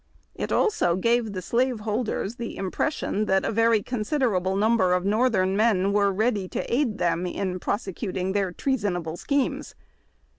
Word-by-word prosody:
It - - -4
also 180 - +2
gave 230 +2 +1
the 185 -1 -5
slave 245 +2 0
hold 215 +2 -1
ers 220 +5 -3
the 235 -1 -6
impression 210 - -1
that 190 -1 +2
a - - 0
very 225 -1 +3
considerable 215 -6 0
number 205 -3 +3
of 180 0 0
northern 205 -3 +2
men 200 -3 +2
were 200 -1 +3
ready 205 -1 0
to - - -4
aid 240 -5 +1
them 175 -1 0
in 185 0 -3
prosecuting 190 -1 -3
their 195 -2 0
treasonable 180 - -2
schemes. 280 +8 -2
205 Hz, 155 wpm, -25 LUFS, 185-235 Hz, -, very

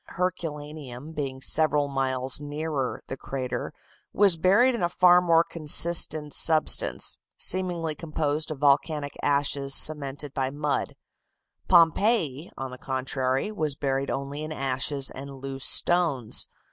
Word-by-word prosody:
Herculaneum 150 -6 -5
being 135 -4 -5
several 150 -2 +1
miles 135 0 -1
nearer 145 -2 -3
the - - -6
crater, 130 -2 -5 0.4
was 200 -4 +3
buried 200 +10 +3
in 235 - -4
a 175 - +1
far 180 0 +5
more 165 -2 +4
consistent 155 -2 +2
substance, 160 -2 +3 0.2
seemingly 175 -3 +1
composed 155 -1 -2
of 155 - -5
volcanic 145 +1 +1
ashes 140 -1 +1
cemented 145 -2 +1
by 130 -1 -1
mud; 145 +1 -2 0.7
Pompeii, 170 - +3
on 135 -1 -5
the 125 - -10
contrary, 130 +5 -2
was 155 -8 -2
buried 135 -1 -2
only 140 +2 -4
in 155 0 -6
ashes 135 -1 -1
and 140 +1 -9
loose 135 0 -4
stones. 160 -10 +2
145 Hz, 125 wpm, -26 LUFS, 135-165 Hz, 0.7 s, far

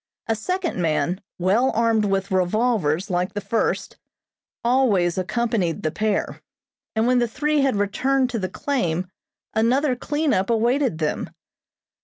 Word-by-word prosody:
A 225 - +1
second 345 - -2
man, 165 +3 0 0.2
well 205 +9 +2
armed 225 -1 +2
with 195 -1 -1
revolvers 190 -2 +1
like 180 +1 0
the - - 0
first, 225 +2 -1 0.7
always 225 -9 +2
accompanied 190 -3 -1
the 155 - 0
pair, 210 +4 -1 0.5
and 220 +1 +2
when 250 0 +3
the 240 - +2
three 300 +5 0
had 270 -4 +2
returned 255 +6 +1
to 230 - -2
the 185 -2 -2
claim 185 - -2 0.4
another 255 +5 +2
cleanup 285 -7 0
awaited 235 - +2
them. 155 -2 -2
220 Hz, 135 wpm, -23 LUFS, 185-250 Hz, 0.7 s, when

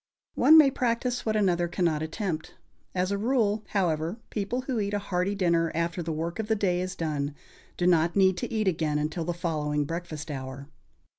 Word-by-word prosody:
One 315 - +7
may 290 -3 +7
practise 245 -1 -1
what 215 - +1
another 180 -4 +2
cannot 170 -3 0
attempt. 160 0 -4 0.4
As 185 +1 0
a 200 - 0
rule, 220 -2 +1
however, 170 -1 0
people 215 +4 -2
who 255 -3 -2
eat 205 0 -1
a - - +2
hearty 200 0 -1
dinner, 170 -4 +2
after 170 +1 -1
the 165 -1 -3
work 165 +5 -3
of 220 - -2
the 220 - +2
day 180 -4 +1
is 185 0 -4
done, 150 -4 -2 0.4
do 175 - 0
not 170 -1 +3
need 190 -2 +4
to - - -4
eat 215 -3 0
again 155 -4 +1
until 155 +3 -2
the 175 - -1
following 150 -3 -1
breakfast 160 -1 -5
hour. 135 0 -6
175 Hz, 195 wpm, -27 LUFS, 160-205 Hz, 0.4 s, One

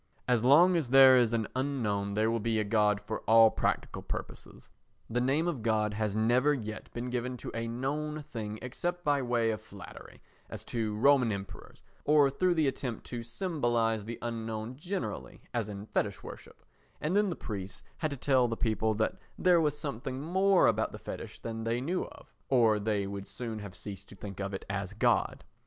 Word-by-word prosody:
As 120 -2 +2
long 165 +8 +6
as 155 -8 0
there 135 0 +8
is 120 -3 +4
an 115 -3 0
unknown 110 -7 -1
there 110 +1 +2
will 115 - 0
be 115 +1 0
a - - +1
God 105 -1 +2
for 110 +1 -5
all 115 0 +7
practical - - -1
purposes; - - -8 0.4
the 120 +2 -1
name 140 +7 +2
of 150 -9 -2
God 110 -1 +1
has 105 -1 -1
never 125 +7 +3
yet 110 -4 -7
been 120 +1 -5
given 125 +1 -2
to - - -7
a 115 0 -3
known 150 +6 -3
thing 110 -7 -6
except 175 +8 -3
by 145 -3 +2
way 120 -2 +1
of 110 - -4
flattery, - - -12 0.3
as - - -7
to 110 -3 -2
Roman 125 0 +4
Emperors, 100 -1 -8 0.2
or 145 -2 +5
through 180 +5 +1
the 155 -3 +2
attempt 125 -3 -3
to 120 -1 -3
symbolise 120 - 0
the 115 +2 -6
unknown 115 0 -4
generally, 125 - -5
as 115 -3 -1
in 100 0 -7
fetish - - -2
worship, - - -11 0.3
and 155 +5 -1
then 205 -1 +3
the 175 - -3
priests 100 -3 -6
had 155 - -1
to 140 - -5
tell 130 -1 +3
the 115 -1 -3
people 110 -1 0
that 110 +1 0 0.2
there 180 -2 +4
was 150 -2 0
something 130 -3 -4
more 190 +5 +3
about - - +2
the - - -6
fetish - - -7
than 115 -1 -5
they 115 +1 0
knew 170 +8 -1
of, - - -15 0.2
or 115 -5 +4
they 105 -1 0
would 100 0 -6
soon 110 +2 -5
have 100 -3 -8
ceased 100 +1 -8
to - - -12
think 100 0 -8
of 100 0 -3
it 95 - -6
as 100 0 -3
God. 105 - +1
115 Hz, 195 wpm, -30 LUFS, 110-140 Hz, 0.4 s, there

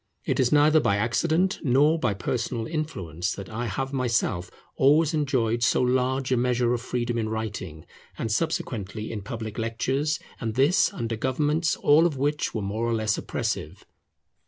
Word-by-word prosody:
It - - 0
is 125 -2 +3
neither 150 +1 +5
by 100 -9 +2
accident 160 - +1
nor 145 +4 +3
by 105 - 0
personal 115 +3 -2
influence 95 - -3
that 100 -2 -8
I 120 +2 -3
have 135 +7 -3
myself 115 -9 0 0.3
always 150 +4 +4
enjoyed 130 -6 0
so - - +3
large 130 +1 +1
a 130 - +3
measure 120 0 +1
of 120 - -2
freedom 120 -1 -2
in 110 -1 -1
writing, 105 -8 -5 0.3
and 110 - -3
subsequently 110 - -2
in 110 -2 -4
public 110 +1 -6
lectures, 130 +7 -1 0.2
and 110 -2 -3
this 140 +8 +3
under 115 - -3
governments 150 +7 0
all 155 +4 +5
of 150 -5 -5
which 145 +3 0
were 110 - -3
more 110 +4 -2
or 115 - +1
less 110 -1 +1
oppressive. - - -4
120 Hz, 165 wpm, -26 LUFS, 110-145 Hz, 0.3 s, neither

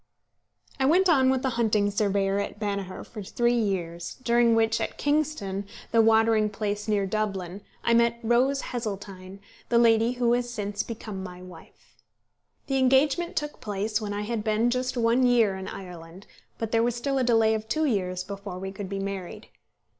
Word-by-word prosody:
I 265 - +3
went 365 +5 +4
on 265 -5 +4
with 260 0 +1
the 265 - +1
hunting 210 -2 +2
surveyor 200 -1 +1
at 200 0 -4
Banagher 200 -3 -3
for 215 - -9
three 240 +5 0
years, 175 -7 -2
during 235 -1 +4
which, 225 0 +2
at - - -3
Kingstown, 290 -10 -1 0.3
the 230 - +5
watering 220 -1 +4
place 210 0 -3
near 205 -2 +1
Dublin, 195 -2 -3 0.2
I 235 - +3
met 235 0 +3
Rose 255 +4 +2
Heseltine, 195 -4 -6 0.3
the 235 - +3
lady 230 0 +4
who 240 -1 +1
has 245 0 0
since 205 -3 -3
become 215 -4 -6
my 180 -1 -9
wife. 180 -3 -16 0.7
The 270 -1 0
engagement 290 +7 +2
took 295 -3 -3
place 210 +2 -2
when 210 -1 -4
I 205 0 -3
had 220 0 -3
been 220 +2 +1
just 255 +1 -2
one 235 +2 +3
year 235 -5 +4
in 190 0 -6
Ireland; 180 -1 -9 0.3
but 225 -1 -4
there 225 - +3
was 235 0 +1
still 270 +3 -1
a - - +2
delay 225 -2 +3
of 220 0 -3
two 315 +4 +1
years 185 -8 -1
before 200 -1 -7
we 190 +1 -5
could 195 -1 -7
be 195 - -3
married. 195 +2 -6
220 Hz, 180 wpm, -26 LUFS, 195-240 Hz, 0.7 s, the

